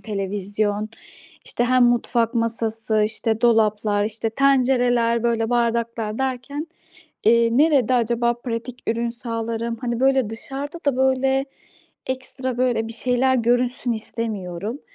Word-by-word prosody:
televizyon, 205 +1 -2 0.6
işte, 240 - -1
hem 255 0 +4
mutfak 240 0 +1
masası, 225 -1 0
işte 220 +1 -2
dolaplar, 215 -3 +2
işte 220 +1 -3
tencereler, 245 -3 +2
böyle, 230 -1 0
bardaklar 230 -2 0
derken, 265 +4 -3 0.6
eee, 230 +1 +5
nerede 280 -6 +4
acaba 235 0 +2
pratik 240 +1 -5
ürün 235 +1 0
sağlarım? 230 0 -4
Hani, 240 -1 -2
böyle, 265 -4 +3
dışarıda 275 +7 -6
da 270 -3 +2
böyle 265 +1 +2 0.6
ekstra, 260 -1 -4
böyle, 240 -3 +1
bir 230 - -7
şeyler 255 +2 +1
görünsün 245 +1 +1
istemiyorum. 215 0 -5
235 Hz, 115 wpm, -22 LUFS, 225-255 Hz, 0.6 s, eee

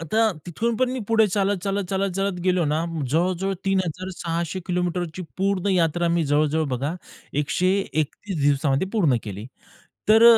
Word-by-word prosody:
आता 220 +7 +2 0.2
तिथून 225 +7 -1
पण 255 +2 +1
मी 255 0 -3
पुढे 220 -1 +5
चालत-चालत, 200 0 0
चालत-चालत 195 0 0
गेलो 180 -2 +3
ना. 155 +2 0 0.3
जवळजवळ 185 +5 +1
3600 180 -2 -2
किलोमीटरची 180 -1 -2
पूर्ण 195 0 0
यात्रा 175 -1 +2
मी 170 -1 +2
जवळ-जवळ 150 +2 +2
बघा 135 +5 -2 0.5
131 185 +1 -1
दिवसामध्ये 140 +2 +2
पूर्ण 170 - +3
केली. 105 +1 -6 0.6
तर 220 +1 +7
180 Hz, 125 wpm, -24 LUFS, 160-195 Hz, 0.6 s, तर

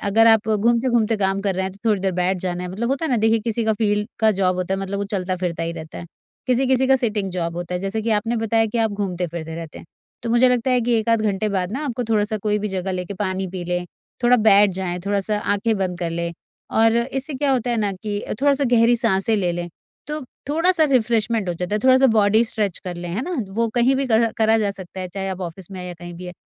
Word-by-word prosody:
अगर 220 +3 +3
आप 220 -1 +4
घूमते-घूमते 230 +1 +2
काम 195 -1 0
कर 195 -2 0
रहे 190 - -1
हैं 190 - -4
तो 200 - -18
थोड़ी 210 -3 +2
देर 190 -1 0
बैठ 180 +1 0
जाना 180 -1 -3
है 180 - -4
मतलब 225 +5 -3
होता 275 +4 -1
है 315 - -1
ना, 245 - +3
देखिए 225 +1 +3
किसी 225 +1 -2
का 220 - +2
फील्ड 210 0 0
का 220 -1 +4
जॉब 185 -2 +1
होता 185 +1 -1
है, 195 - -3
मतलब 195 +1 -3
वो 200 - -1
चलता-फिरता 185 -4 -2
ही 165 0 -2
रहता 160 -2 -8
है। 170 - -8 0.4
किसी-किसी 260 +1 +2
का 265 0 +5
सिटिंग 210 -6 -1
जॉब 170 -2 -3
होता 175 +1 -4
है, 180 - -2
जैसे 195 +3 -2
कि 225 - -1
आपने 225 +3 +1
बताया 225 0 +1
कि 230 +2 -3
आप 225 -1 +2
घूमते-फिरते 175 -5 -4
रहते 165 -2 -8
हैं। - - -12 0.4
तो 230 - -3
मुझे 245 +2 +5
लगता 250 +1 +1
है 250 -1 +3
कि 235 0 +1
1 220 - -3
आध 230 -1 +3
घंटे 210 0 0
बाद 190 -1 -2
ना 290 +4 -3
आपको 245 -3 -2
थोड़ा 210 -2 +2
सा 215 +1 -3
कोई 210 0 0
भी 210 +1 -3
जगह 190 0 -3
लेकर 180 +2 -4
पानी 190 -1 -1
पी 180 -2 -5
लें, 180 0 -2 0.4
थोड़ा 250 +1 +6
बैठ 205 -2 +5
जाएँ, 180 -2 -3
थोड़ा 200 0 +1
सा 210 +2 -1
आँखें 210 +2 0
बंद 180 -2 -2
कर 170 -2 -2
लें। 170 0 -3 0.4
और 225 +1 +4
इससे 270 +4 -2
क्या 280 +1 0
होता 250 -1 0
है 235 - +1
ना 205 -3 0
कि 205 +2 -4
अ, - - -6
थोड़ा 285 - +5
सा 280 - -1
गहरी 235 +1 +5
साँसें 195 +1 +1
ले 180 -3 0
लें, 175 0 -4 0.4
तो 300 +1 -4 0.3
थोड़ा 330 +5 +2
सा 320 -3 +4
रिफ्रेश्मेन्ट 225 -4 +1
हो 175 - -1
जाता 180 +4 -3
है, - - +2
थोड़ा 260 0 +7
सा 270 0 +5
बॉडी 215 +1 +4
स्ट्रेच 210 -5 -2
कर 180 -1 -4
लें, 175 0 -6
है 215 +8 -2
ना? 360 +4 -3 0.2
वो 230 +2 0
कहीं 245 +3 +3
भी 275 0 0
करा 230 -1 +3
करा 220 0 +4
जा 205 -2 +1
सकता 190 -1 -8
है, 185 - -4
चाहे 195 +1 -4
आप 190 0 -5
ऑफिस 180 +1 -7
में 190 - -7
हैं 180 - -6
या 175 - -6
कहीं 175 +1 -9
भी 180 +2 -9
है। 180 - -7
210 Hz, 275 wpm, -22 LUFS, 185-230 Hz, 0.4 s, थोड़ा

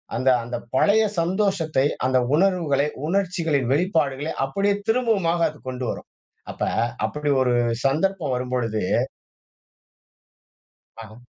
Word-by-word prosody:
அந்த 130 +3 +2
அந்த 120 +1 -4 0.2
பழைய 205 +10 +4 0.2
சந்தோஷத்தை, 165 -6 +1 0.2
அந்த 130 0 +2 0.2
உணர்வுகளை, 165 -6 +2 0.2
உணர்ச்சிகளின் 165 -8 0
வெளிப்பாடுகளை 155 -3 0
அப்பிடியே 200 +9 0
திரும்பவுமாக 220 -8 +1
அது 150 - -13
கொண்டு 125 0 -4
வரும். - - -6 0.4
அப்ப - - -15 0.4
அப்பிடி 150 0 -3
ஒரு 125 -1 +2 0.3
சந்தர்ப்பம் 160 +1 +1
வரும்பொழுது 125 -3 -2 2.2
ஆஹ். 110 +2 -14
155 Hz, 100 wpm, -23 LUFS, 130-190 Hz, 2.2 s, பழைய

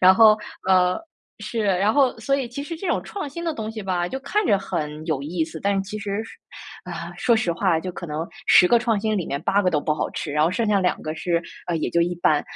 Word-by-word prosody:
然 185 +1 +7
后 215 0 +7 0.3
呃， 185 -1 +4 0.4
是， 220 +2 -3
然 195 +2 +2
后 275 -3 +3
所 275 +5 0
以 265 -3 -1
其 280 +4 -6
实 330 +3 -5
这 365 +4 -6
种 - - +1
创 395 -8 -5
新 340 +5 -7
的 330 - 0
东 220 -3 -4
西 220 -1 -6
吧， 180 -2 -1
就 265 - -4
看 420 +10 0
着 200 - +4
很 155 -5 -4
有 150 -5 -1
意 160 +2 -1
思， 160 0 -9
但 200 0 +1
是 - - +2
其 205 +2 -6
实 200 0 -3 0.6
啊， - - -6
说 235 -2 +3
实 180 -6 0
话， 170 -1 +1
就 180 +2 -5
可 175 - -7
能 155 +1 -3 0.2
10 180 - +7
个 240 - +5
创 230 -3 +1
新 215 0 0
里 180 - -1
面 140 - -3
8 205 +1 +2
个 180 - +2
都 150 - +1
不 150 +1 0
好 150 - -2
吃， 150 - -5
然 150 +1 +3
后 165 - +2
剩 225 +4 0
下 205 -2 +3
2 180 - 0
个 155 - -4
是 170 +1 0 0.3
呃， 175 - 0
也 155 - -1
就 170 - +2
一 175 +1 +1
般。 155 -3 +2
190 Hz, 270 characters per minute, -23 LUFS, 170-225 Hz, 0.6 s, 然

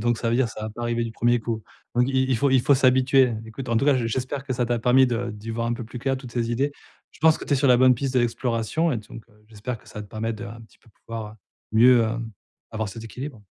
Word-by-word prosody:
donc 120 -1 +1
ça 115 - -1
veut 115 - +2
dire, 130 -2 +2
ça 115 - -9
va 110 - -4
pas 120 +3 -8
arriver 120 0 0
du 115 - -4
premier 120 +1 +2
coup. 110 0 -3 0.3
Donc 120 +1 +4
i 130 -1 +2
il 130 - +2
faut 140 +4 +2
il 130 -1 +5
faut 140 - +4
s'habituer. 130 -1 +4
Écoute, 125 +4 -8
en 115 - +1
tout 115 - +2
cas, 145 -2 +4
j'espère 130 +3 -2
que 135 - -3
ça 125 -1 0
t'a 120 0 0
permis 125 +3 +5
de 120 0 -2
d'y 105 +1 -8
voir 115 +1 -2
un 120 - 0
peu 120 0 -4
plus, 125 +2 -8
clair 135 +2 -1
toutes 130 -3 -10
ces 120 -1 -1
idées. 135 +5 0 0.4
Je - - -20
pense 160 0 +5
que - - -7
tu 145 - +1
es - - +2
sur 140 +1 +2
la 125 - +7
bonne 130 0 +6
piste 135 +2 -3
de 125 - +4
l'exploration 120 +6 0
et 120 - -1
donc, 110 +2 -11
heu, 105 0 -25
j'espère 110 +2 -6
que - - -20
ça - - -9
va - - -5
te 105 - -13
permettre 110 +2 -3
de, 115 - -6
un 115 0 -9
petit 110 - -18
peu, 115 - -24
pouvoir, 110 0 -8
heu, - - -15 0.4
mieux, 120 +2 +6
heu, 110 +1 -2 0.5
avoir 110 -1 -3
cet 110 +3 -8
équilibre. 125 +1 -7
120 Hz, 300 wpm, -24 LUFS, 115-130 Hz, 0.5 s, la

